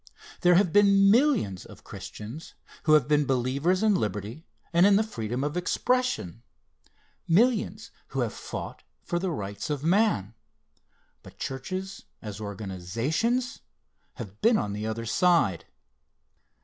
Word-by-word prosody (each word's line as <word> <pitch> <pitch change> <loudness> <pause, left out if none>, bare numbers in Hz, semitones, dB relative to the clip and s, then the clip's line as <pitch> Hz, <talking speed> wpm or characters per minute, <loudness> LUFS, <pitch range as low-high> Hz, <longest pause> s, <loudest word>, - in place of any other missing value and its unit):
There 180 -1 +5
have 180 -2 +3
been 200 -1 +6
millions 235 - +2
of - - -15
Christians 115 +10 -9 0.3
who 155 - +5
have 150 -5 +5
been 150 0 +3
believers 135 - +1
in 215 -1 +4
liberty 105 - -3 0.3
and 175 +3 +6
in 205 - +5
the 215 - +3
freedom 125 - -4
of 145 +2 -2
expression 185 - -1 0.9
millions 220 +6 +1 0.2
who - - -3
have - - -2
fought - - -7 0.2
for 175 - -2
the 185 +1 -2
rights 100 - -5
of 145 -2 -3
man 165 - +2 0.9
but - - -15
churches 185 +9 -5
as 105 -1 -8
organizations, 110 - -2 0.6
have 105 -3 -9
been 230 0 +4
on 105 - -2
the 105 +1 -4
other 115 +1 -4
side. 165 - +2
155 Hz, 135 wpm, -27 LUFS, -, 0.9 s, been